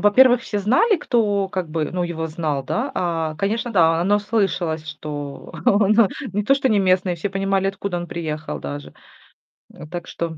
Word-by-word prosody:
во-первых, 245 +4 +5
все 205 - -3
знали, 260 - +3
кто, 205 -8 +1
как 185 -3 -3
бы, 155 -1 -2
ну, 180 0 -2
его 165 -2 -3
знал, 155 -4 -2
да. 235 - -2
А, 165 -5 -1
конечно, 225 +6 -1
да, 165 -4 +4
оно 205 +4 +3
слышалось, 180 -7 -1
что 150 -2 -7
он 205 +1 +4
о 230 - +7 0.3
не 205 +1 0
то 275 - +4
что 270 -1 +1
неместный, 185 -3 +2
все 175 +4 -4
понимали, 195 0 0
откуда 195 -2 -3
он 175 - -4
приехал 155 - -4
даже. 70 +2 -7 0.8
Э, - - -11
так 175 +1 -6
что 165 -1 -4
185 Hz, 180 wpm, -21 LUFS, 160-205 Hz, 0.8 s, о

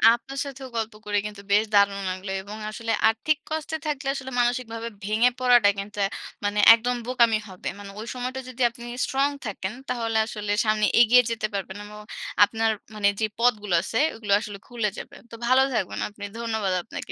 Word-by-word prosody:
আপনার 270 +3 -10
সাথেও 270 -1 -8
গল্প 225 -1 -2
করে 205 0 0
কিন্তু 210 -1 -7
বেশ 205 +2 +5
দারুণ 200 -1 +4
লাগলো 185 +1 -5
এবং 205 +2 -9
আসলে 225 +1 -4 0.2
আর্থিক 275 +7 +1
কষ্টে 315 0 -3
থাকলে 285 -2 -2
আসলে 265 -1 -6
মানসিকভাবে 240 -2 -1 0.2
ভেঙে 215 +4 +3
পড়াটা 245 -5 +6
কিন্তু 205 +1 -7
অ্যা 195 - +1 0.4
মানে 205 0 0
একদম 245 +2 +1
বোকামি 235 -3 +4
হবে। 185 - -8
মানে 200 -1 -9
ঐ - - -4
সময়টা 255 +1 -4
যদি 255 0 -8
আপনি 235 0 -13 0.2
স্ট্রং 275 +2 +1 0.2
থাকেন 195 -1 -4 0.2
তাহলে 230 -3 -1
আসলে 210 -2 -4
সামনে 215 0 +2 0.2
এগিয়ে 245 +2 +7
যেতে 220 -1 -1
পারবেন 195 0 -4
এবং 210 0 -11 0.5
আপনার 225 +1 +2 0.2
মানে 205 -1 +2
যেই 215 -1 0
পথগুলো 210 -5 +2
আছে 225 - -3 0.2
ওগুলো 210 -3 -1
আসলে 205 -2 -7
খুলে 235 -4 -1
যাবে। - - -8 0.2
তো - - -7
ভালো 260 +1 +5
থাকবেন 190 - -1
আপনি। 205 0 -8
ধন্যবাদ 220 -5 -1
আপনাকে। - - -7
225 Hz, 180 wpm, -25 LUFS, 205-245 Hz, 0.5 s, এগিয়ে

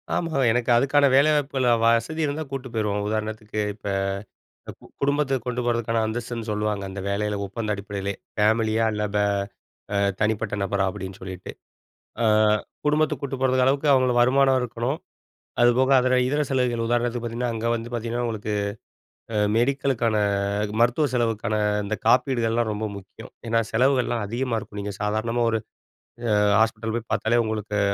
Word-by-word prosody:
ஆமா 165 -4 -1
எனக்கு 120 +2 0
அதுக்கான 140 +4 +4
வேலைவாய்ப்புகள் 140 -1 +3
அ, - - +6
வசதி 115 +8 +2
இருந்தா 150 +2 -2
கூட்டிட்டு 135 -1 -4
போயிருவோம். 105 -2 -1
உதாரணத்துக்கு 110 0 -3
இப்ப 105 - -10 1.1
குடும்பத்த 140 -1 +1
கொண்டு 125 0 -2
போறதுக்கான 115 -1 0
அந்தஸ்துன்னு 115 0 -4
சொல்லுவாங்க, 105 -1 -1
அந்த 100 +1 -6
வேலையில 105 +1 -1
ஒப்பந்த 105 +2 -3
அடிப்படையிலே! 100 0 -4 0.2
ஃபேமிலியா 110 +1 +2
இல்ல, 105 0 -2
பே 105 0 +3 0.7
அ, - - +2 0.2
தனிப்பட்ட 110 -1 0
நபரா 100 0 0
அப்பிடின்னு 95 0 -7
சொல்லிட்டு. 95 -1 -7 0.7
அ, - - +3 0.6
குடும்பத்துக்கு 150 0 +1
கூட்டிட்டு 135 -1 -3
போறதுக்கு 130 -1 +3
அளவுக்கு 140 +3 +1
அவுங்களுக்கு 130 -2 +3
வருமானம் 130 +1 +4
இருக்கணும். 120 +4 -2 0.6
அதுபோக 125 +2 +4
அதுல 130 0 +2
இதர 145 +3 +1
செலவுகள், 125 -3 +1
உதாரணத்துக்கு 120 0 0
பாத்தீங்கன்னா, 120 +1 -2
அங்க 115 +1 -2
வந்து 115 +1 -6
பாத்தீங்கன்னா 120 +1 -2
உங்களுக்கு 110 -2 -3 0.8
அ, - - 0 0.2
மெடிக்கலுக்கான, 120 -3 +1 0.5
அ - - -1
மருத்துவ 120 +6 +3
செலவுக்கான 115 -3 0 0.3
இந்த 110 +2 -2
காப்பீடுகள்லாம் 120 -2 +2
ரொம்ப 105 +1 -3
முக்கியம், 100 +3 -12 0.2
ஏன்னா 115 0 +2
செலவுகள்லாம் 125 -1 +2
அதிகமா 120 +2 -1
இருக்கும். 105 -1 -9
நீங்க 100 0 -4
சாதாரணமா 110 +3 0
ஒரு 115 - +1 0.8
அ, - - +3 0.2
ஹாஸ்பிட்டல் 110 0 0
போய் 115 -1 -5
பாத்தாலே 120 +2 +2
உங்களுக்கு 105 -1 -3
115 Hz, 145 wpm, -24 LUFS, 110-130 Hz, 1.1 s, அ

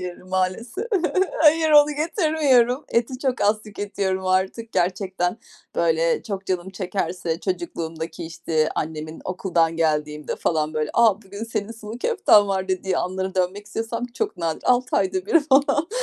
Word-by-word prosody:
hayır, 180 -1 -7
maalesef. 190 - -2 0.6
Hayır, 315 0 +5
onu 295 0 +7
getirmiyorum. 300 - +2
Eti 240 +2 0
çok 260 -3 -1
az 215 +1 +2
tüketiyorum 195 -2 -3
artık. 190 +5 0
Gerçekten 185 +1 -1 0.4
böyle 165 0 +1
çok 195 -3 -5
canım 185 0 -2
çekerse 180 -3 -3
çocukluğumdaki 165 -3 -4
işte 165 -1 -1
annemin 155 0 -4
okuldan 170 -3 0
geldiğimde 150 -2 -1
falan 155 -1 -1
böyle, 155 -1 -1
a, 220 -3 +4
bugün 200 +3 -7
senin 225 -1 -4
sulu 225 +1 -9
köften 210 - +4
var 190 -1 -1
dediği 185 0 0
anlara 190 +1 -3
dönmek 190 +3 -1
istesem 225 +3 -3
çok - - -2
nadir. 165 -2 -3
6 250 0 +2
ayda 190 -1 0
1 325 +9 +5
falan. 290 +2 +2
190 Hz, 140 wpm, -23 LUFS, 175-230 Hz, 0.6 s, onu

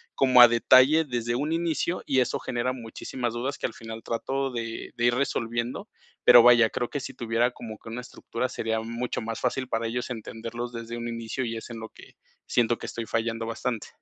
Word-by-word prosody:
como 130 -2 +6
a 120 - +12
detalle 130 +6 +5
desde 120 -3 -2
un 150 +5 -1
inicio, 170 +1 -1
y 130 - +2
eso 125 - +1
genera 125 +1 -2
muchísimas 120 0 -5
dudas, 130 +4 -3
que - - -1
al - - -10
final 115 -1 -9
trato 135 +4 -2
de 115 -2 -5
de 120 - 0
ir 120 0 +4
resolviendo. 120 -3 -2 0.4
Pero 120 - +9
vaya, 120 -2 +7
creo 120 - -2
que 145 - -3
si 130 - -7
tuviera 115 +1 +1
como 110 -3 -9
que - - -11
una 120 +2 -5
estructura, 125 0 -4
sería 110 0 -2
mucho 115 +2 -3
más 115 0 -4
fácil 130 +1 -1
para 115 -2 -1
ellos 125 +2 -3
entenderlos 115 +1 -6
desde 115 0 -6
un 120 0 -4
inicio, 115 +2 -3
y 115 -1 -3
es 110 - -8
en 115 -1 -7
lo 110 0 -7
que - - -16 0.3
siento 120 -1 +2
que - - -8
estoy 115 - -5
fallando 115 0 -1
bastante. 115 0 -3
120 Hz, 210 wpm, -26 LUFS, 115-125 Hz, 0.4 s, a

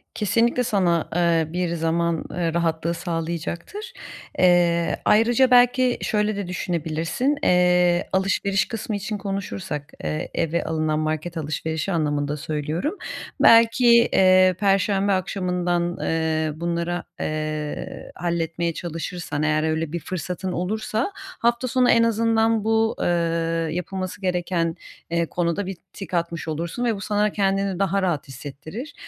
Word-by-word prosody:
Kesinlikle 230 +4 +2
sana, 185 -8 +1
eee, 165 -2 +2
bir 175 -1 -1
zaman, 165 0 0
eee, 170 -2 -1
rahatlığı 170 0 0
sağlayacaktır. 170 - -4 0.5
Eee, 175 -2 +3
ayrıca 235 +4 +4
belki 250 0 +5
şöyle 210 -1 0
de 200 -2 -4
düşünebilirsin. 175 - -1
Eee, 180 0 +3
alışveriş 195 +1 +1
kısmı 225 -2 -4
için 205 +1 -3
konuşursak, 190 -6 -5
eee, 75 0 -3
eve 165 +1 0
alınan 155 -1 -1
market 155 +2 -2
alışverişi 160 +3 -3
anlamında 150 -3 0
söylüyorum, 155 - -3 0.4
belki, 230 +2 +6 0.3
eee, 185 -1 +5
perşembe 195 0 +2
akşamından, 180 -2 -1
eee, 160 -1 0
bunlara, 170 +1 -2 0.2
eee, 155 -1 -4
halletmeye 170 0 -1
çalışırsan 165 -2 -4
eğer 155 0 +2
öyle 160 0 -1
bir 170 - -2
fırsatın 180 +2 -4
olursa, 215 - -2
hafta 235 +2 -1
sonu 250 0 +2
en 230 - +5
azından 225 -1 +2
bu, 225 0 +2
eee, - - 0 0.7
yapılması 185 +2 -4
gereken, 175 -2 -1 0.3
eee, 170 0 +1
konuda 175 +3 -1
bir 190 -1 -5 0.2
tik 195 - -9
atmış 170 -1 -2
olursun 170 +10 -3
ve 230 - +1
bu 195 - -8
sana 210 0 +1
kendini 195 -2 0
daha 195 0 +1
rahat 175 -7 -1
hissettirir 155 - -8
175 Hz, 125 wpm, -23 LUFS, 165-205 Hz, 0.7 s, belki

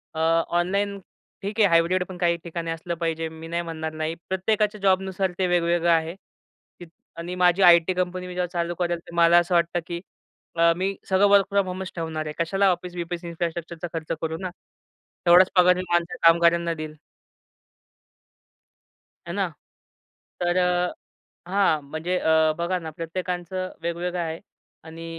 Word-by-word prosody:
अ, - - -4 0.4
online 200 +3 -1 0.4
ठीक 205 +3 -5
आहे 210 - +6
hybrid 170 +2 +3
पण 185 - -8
काही 170 -1 +1
ठिकाणी 170 -1 -4
असलं 165 +1 -4
पाहिजे. 165 -1 -2
मी 160 0 -10
नाही 170 +1 -2
म्हणणार 160 -1 -5
नाही. 155 +1 -3
प्रत्येकाच्या 210 +3 0
जॉबनुसार 190 -1 +1
ते 185 - +2
वेगवेगळं 175 -1 +1
आहे 165 +1 +1 1.0
आणि 170 +2 -5
माझी 180 +1 +3
आय-टी 170 0 +6
कंपनी 180 0 -2
मी 180 - -7
जेव्हा 180 0 -1
चालू 170 0 -2
करेल 175 0 -1
तर, 170 - -15
मला 170 0 +6
असं 175 +1 +2
वाटतं 170 0 +2
की 170 0 -5 0.5
अ, 170 0 +4
मी 195 +2 -1
सगळं 190 +2 +4
वर्क 200 -1 +6
फ्रॉम 200 -1 +1
होमच 185 +1 -5
ठेवणार 160 -2 -4
आहे. 150 - -5
कशाला 195 +4 +2
ऑफिस-बीफीस 175 -1 -5
इन्फ्रास्ट्रक्चरचा 170 0 -4
खर्च 160 -1 -5
करू 160 0 -2
ना? 185 0 -4 0.8
तेवढाच 180 +2 +7
पगार 180 0 +6
मी 185 - -3
माझ्या 175 +7 0
कामगाऱ्यांना 170 0 +4
देईल. 155 -1 -7 2.3
है 170 - -4
ना. 195 -1 0 1.0
तर 175 +1 +1
अ, 180 0 +1 0.6
हां. 190 -6 +2
म्हणजे 165 +4 -2
अ, 160 -1 +3
बघा 175 +2 -1
ना 160 -2 -7
प्रत्येकाचं 180 +2 -4
वेगवेगळं 175 +1 -2
आहे 165 0 -4 0.5
आणि 165 +1 -9
175 Hz, 155 wpm, -24 LUFS, 165-185 Hz, 2.3 s, तेवढाच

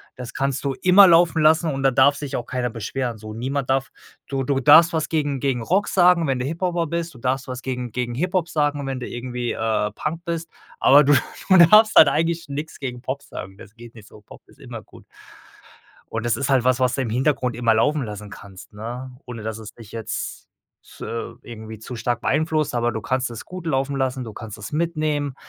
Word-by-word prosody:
Das 125 -2 -8
kannst 135 0 -2
du 135 - 0
immer 190 +2 +7
laufen 165 -2 +4
lassen 160 +1 +4
und 135 - -4
da 135 - +3
darf 135 +3 +4
sich 145 -1 -5
auch 120 - -3
keiner 125 -1 -2
beschweren, 115 +1 -4
so. 110 0 -9
Niemand 130 +4 -3
darf 135 0 +1 0.4
du 135 -1 -2
du 135 0 0
darfst 155 +5 +7
was 155 -1 -1
gegen 145 -4 -1
gegen 130 -3 -1
Rock 190 - +1
sagen, 175 -3 +4
wenn 130 -2 0
du 125 - -2
Hip-Hopper 170 +2 -1
bist. 170 0 -3
Du - - -14
darfst 130 +2 -2
was 130 0 -6
gegen 125 -2 -4
gegen 125 -1 -2
Hip-Hop 180 +3 0
sagen, 145 -2 0
wenn 135 -1 -3
du 120 - -6
irgendwie, 120 0 -4
äh, 110 -1 -1
Punk 165 +2 -4
bist, 170 -1 -4 0.3
aber 145 +2 +7
du 145 - +4 0.4
du 190 - +7
darfst 215 +6 +7
halt - - +9
eigentlich 165 +1 -1
nix 150 +3 -6
gegen 125 -3 -5
Pop 130 +2 -4
sagen. 95 +1 -9
Das 100 - -14
geht 120 0 -13
nicht 110 -2 -14
so. 105 - -16
Pop - - -15
ist - - -22
immer - - -8
gut. - - -17 1.1
Und 115 +1 -3
das 120 - +1
ist 140 0 -2
halt 130 -3 +3
was, 130 0 +2
was 125 -2 +2
du 135 - -1
im 115 - -3
Hintergrund 125 -1 0
immer 115 -2 +2
laufen 145 +5 +1
lassen 105 -1 -8
kannst, 95 -2 -12
ne, 120 +4 -7
ohne 120 -3 -7
dass 110 0 -5
es 110 -1 -10
dich 110 -3 -14
jetzt 115 -2 -5 0.4
f - - -18
äh, 115 0 -5
irgendwie 110 -1 -9
zu 120 +2 -8
stark 120 +1 -2
beeinflusst, 155 0 0
aber 120 0 0
du 110 - -4
kannst 130 +3 -1
es 115 - -8
gut 180 -2 -9
laufen 135 -2 -1
lassen, 130 -1 -1
du 110 - -8
kannst 110 -1 -9
es 105 - -8
mitnehmen, 155 -3 -1
130 Hz, 225 wpm, -22 LUFS, 120-155 Hz, 1.1 s, halt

